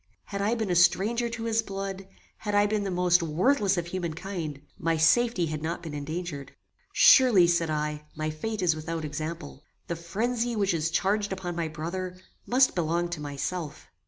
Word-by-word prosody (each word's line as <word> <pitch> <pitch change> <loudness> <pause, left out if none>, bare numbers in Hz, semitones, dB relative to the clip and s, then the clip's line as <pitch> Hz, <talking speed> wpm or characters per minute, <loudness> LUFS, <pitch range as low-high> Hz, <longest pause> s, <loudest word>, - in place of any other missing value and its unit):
Had 200 -1 -5
I 215 +4 +1
been 220 -5 -2
a - - +2
stranger 210 +7 +3
to 230 -1 -5
his 225 0 +1
blood; 195 -2 -5 0.3
had 210 -1 -3
I 205 0 +5
been 205 -1 0
the - - -1
most 180 -1 +3
worthless 190 - +2
of 175 - -1
human 175 -2 -4
kind; 165 -6 -5 0.2
my 165 0 +1
safety 180 +4 +3
had 155 -1 -4
not 170 +2 -3
been 160 -3 -6
endangered. 150 0 -5 0.4
Surely, 240 -10 +7
said 170 -1 +1
I, 150 0 -2
my 155 0 -2
fate 205 +6 -4
is 165 -3 +3
without 160 0 -4
example. 155 -1 -6 0.2
The 170 - -3
phrenzy 230 +8 -2
which 200 -3 +1
is 165 -1 0
charged 205 +4 0
upon 185 -2 -4
my 170 -1 -1
brother, 180 +4 -5 0.3
must 255 +1 +4
belong 170 0 0
to 170 -3 -5
myself. 150 +2 -5
175 Hz, 185 wpm, -27 LUFS, 160-205 Hz, 0.4 s, Surely